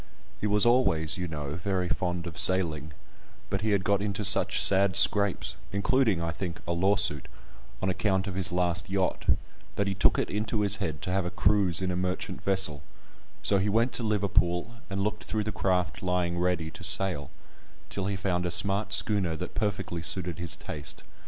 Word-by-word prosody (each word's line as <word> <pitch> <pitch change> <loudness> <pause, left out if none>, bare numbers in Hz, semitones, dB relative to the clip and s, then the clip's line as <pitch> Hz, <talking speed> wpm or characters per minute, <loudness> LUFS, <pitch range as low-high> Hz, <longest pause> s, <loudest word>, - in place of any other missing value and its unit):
He 105 - -1
was 105 +1 +4
always, 90 -11 +2
you 90 - -2
know, 75 -3 -5
very 95 0 -2
fond 90 +3 -2
of 85 -1 -5
sailing, 80 -5 +2 0.6
but 100 - -1
he 110 - -1
had 100 -2 +1
got 100 0 +1
into 105 0 -2
such 100 - +5
sad 95 -1 +4
scrapes 100 -2 +4
(including, 105 0 +1
I 85 0 -2
think, 85 +1 -5
a 85 - -3
lawsuit) 95 -3 +2 0.6
on - - +1
account 95 0 0
of 100 - -4
his 95 -1 -2
last 90 0 -1
yacht, 95 -1 -1 0.5
that 100 - 0
he 100 - -1
took 95 - +2
it - - 0
into 105 +1 -1
his 100 -2 +1
head 80 -2 -4
to 90 - -2
have 95 +1 +1
a - - -2
cruise 95 -2 +1
in 90 - 0
a - - -2
merchant 90 0 -3
vessel, 95 -7 0 0.6
so 100 - +3
he 100 +2 0
went 115 +4 +1
to - - 0
Liverpool, 100 -3 0 0.2
and 100 0 -2
looked 105 +1 -3
through 110 -1 -2
the 110 - -3
craft 90 -3 -1
lying 90 -2 -1
ready 90 -3 -1
to 90 - -11
sail, 90 -5 +2 0.6
till 95 -1 -3
he 100 - -1
found 95 -2 -1
a - - -1
smart 100 +4 +1
schooner 95 -6 0
that 90 +3 -6
perfectly 95 -5 -2
suited 85 0 +1
his 85 -1 +1
taste. 70 -3 -6
95 Hz, 190 wpm, -28 LUFS, 85-100 Hz, 0.6 s, such